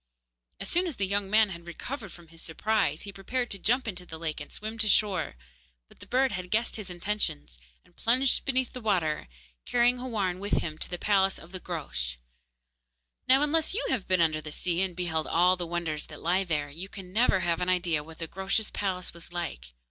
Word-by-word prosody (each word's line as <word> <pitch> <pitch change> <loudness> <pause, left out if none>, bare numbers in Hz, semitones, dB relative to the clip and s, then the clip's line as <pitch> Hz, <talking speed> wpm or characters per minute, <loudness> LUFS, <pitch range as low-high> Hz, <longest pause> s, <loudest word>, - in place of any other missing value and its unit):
As 195 - -4
soon 360 +2 +2
as 320 - -4
the 200 - +1
young 200 0 0
man 215 0 +5
had 170 -2 -8
recovered 215 +4 -6
from 170 -2 -13
his 165 0 -14
surprise, 165 -2 0
he 200 - -7
prepared 240 +6 -2
to 200 - -5
jump 245 +5 +2
into 180 -4 -3
the 160 -2 -8
lake 160 -2 -3
and 145 - -9
swim 220 +2 -6
to 220 - +2
shore. 195 - +3 0.5
But - - -20
the - - -12
bird 260 +1 +3
had 180 -1 -4
guessed 225 +4 +1
his 210 -4 -6
intentions, 175 - -2 0.3
and - - -26
plunged 255 +3 +3
beneath 260 -2 0
the 250 - -6
water, 175 - +1 0.4
carrying 245 +1 +3
Houarn 205 -8 -1
with 200 +1 -3
him 155 -1 0
to - - -1
the 175 - -3
palace 195 0 +3
of 170 - -13
the 185 - -4
Groac'h. 65 - -4 1.1
Now, 265 +3 +6
unless 320 +4 +2
you 480 - 0
have 245 -8 0
been 185 -2 +3
under 155 -2 +3
the 150 - -7
sea 175 +2 0
and 190 -2 0
beheld 165 -3 -1
all 180 +2 +5
the 175 -2 -4
wonders 165 -3 -2
that 150 - -10
lie 185 +3 +2
there, 150 -4 -1
you 175 +6 -7
can 185 -2 -10
never 215 -4 +4
have 170 -1 0
an 180 - +1
idea 175 -4 +2
what 160 +1 -12
the 165 - -4
Groac'h's 195 +5 0
palace 185 -2 -2
was 170 0 -13
like. 115 - -4
185 Hz, 215 wpm, -29 LUFS, 165-215 Hz, 1.1 s, Now